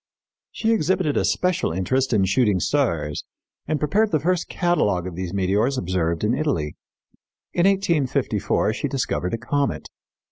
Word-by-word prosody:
She 225 0 0
exhibited 185 -6 +1
a - - +2
special 180 - +1
interest 130 +10 0
in 105 -4 +3
shooting 100 -1 +2
stars 85 - 0 0.4
and 155 +1 0
prepared 205 +10 +2
the 155 - +1
first 175 +3 0
catalogue 105 - +1
of 90 - -5
these 90 -1 -4
meteors 100 +7 +1
observed 85 -4 -1
in 110 +3 +2
Italy. 130 - -1 0.8
In 175 +2 +3
1854 170 -9 +1
she - - -2
discovered 90 +4 -1
a - - -5
comet. 140 +2 -2
130 Hz, 145 wpm, -23 LUFS, -, 0.8 s, in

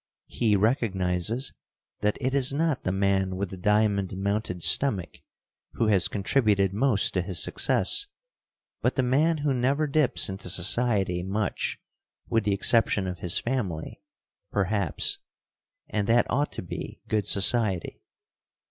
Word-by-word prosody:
He 110 -3 +1
recognizes 105 0 0 0.5
that 105 0 0
it 130 0 -1
is 135 -2 +3
not 150 -1 -1
the 90 - +1
man 95 -1 0
with 95 0 -3
the - - -6
diamond 100 0 +1
mounted 100 -3 -2
stomach 105 -11 +1 0.5
who 115 - 0
has 95 -4 +4
contributed 100 -2 +1
most 110 -1 +1
to 90 - +1
his 90 -4 +1
success, 255 - +1 0.7
but - - 0
the 130 - +1
man 150 +6 +2
who 145 -2 0
never 135 +5 +1
dips 150 -2 +1
into 95 -1 -6
society 95 0 +2
much 100 +3 -2 0.5
with 115 -2 0
the 105 - +2
exception 105 -1 +2
of 90 -1 -5
his 90 - +1
family, 105 -11 -3 0.5
perhaps, 100 -4 -1 0.7
and 105 -2 -2
that 120 +1 +4
ought 145 +3 0
to - - -5
be 85 - -7
good 105 -2 -1
society. 100 -3 +1
105 Hz, 140 wpm, -26 LUFS, 95-125 Hz, 0.7 s, has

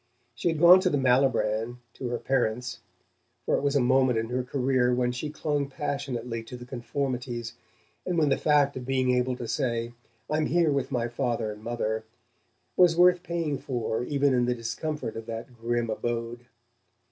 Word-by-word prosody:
She 120 - -3
had 165 -2 +1
gone 175 +4 +8
to 185 -1 +1
the 145 - +1
Malibran, 125 -3 +2 0.2
to 130 - -5
her 120 0 -2
parents 125 -2 -1 0.7
for - - +2
it - - 0
was 140 0 0
a - - +5
moment 130 -1 +3
in 110 0 -2
her 125 +1 0
career 125 -1 +1
when 125 0 +1
she 125 +5 -4
clung 145 -2 -1
passionately 130 -5 -3
to 120 +2 -9
the 125 - -10
conformities, 120 -2 -4 0.5
and 180 -2 -2
when 155 -3 +3
the 135 - +4
fact 145 -2 +3
of 130 - -5
being 130 0 +1
able 125 0 +1
to 120 -1 -6
say: 115 0 -1 0.3
"I'm 155 0 0
here 170 -2 +3
with 140 -1 -1
my 120 -3 0
father 120 -3 -2
and 105 0 -10
mother" 110 -2 -2 0.7
was 175 -2 +5
worth 180 0 +6
paying 170 -5 -2
for 120 -2 -2
even 140 0 +1
in 125 -1 +2
the 125 0 0
discomfort 120 +3 -4
of 115 0 -7
that 115 +2 -7
grim 120 0 -1
abode. 120 +1 -3
125 Hz, 180 wpm, -27 LUFS, 120-140 Hz, 0.7 s, gone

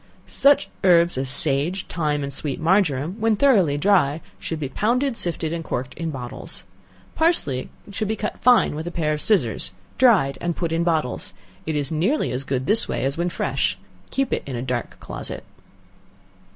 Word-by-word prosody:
Such 280 +1 +4 0.2
herbs 175 -2 +5
as 130 0 -2
sage, 145 +7 +1
thyme 150 -3 -1
and 140 0 -5
sweet 140 -1 -1
marjoram, 165 -1 +1
when 225 0 +2
thoroughly 200 - +3
dry, 160 -3 +2 0.2
should 160 - -4
be 145 - -2
pounded, 240 - 0
sifted, 165 -5 -2
and 165 -1 -4
corked 130 -4 -4
in 165 -1 -4
bottles. 130 -3 -6 0.5
Parsley 150 - +1 0.2
should 215 +1 -2
be 220 - -1
cut 215 - -4
fine 245 -9 +4
with 155 +3 -5
a - - -3
pair 155 -3 0
of 150 - -3
scissors, 125 - +2 0.3
dried, 205 - +4
and 170 -1 -1
put 170 -2 -2
in 165 +1 +1
bottles; 160 -6 -1 0.3
it 160 - -1
is 145 -1 -1
nearly 180 - 0
as 125 +2 -3
good 130 -1 -2
this 220 +7 +3
way - - -1
as 135 +1 0
when 175 +1 -1
fresh; 170 - -1 0.3
keep 270 -1 -1
it - - 0
in 135 - -4
a 120 - -3
dark 125 -2 -4
closet. - - -7
165 Hz, 180 wpm, -23 LUFS, 140-200 Hz, 0.5 s, herbs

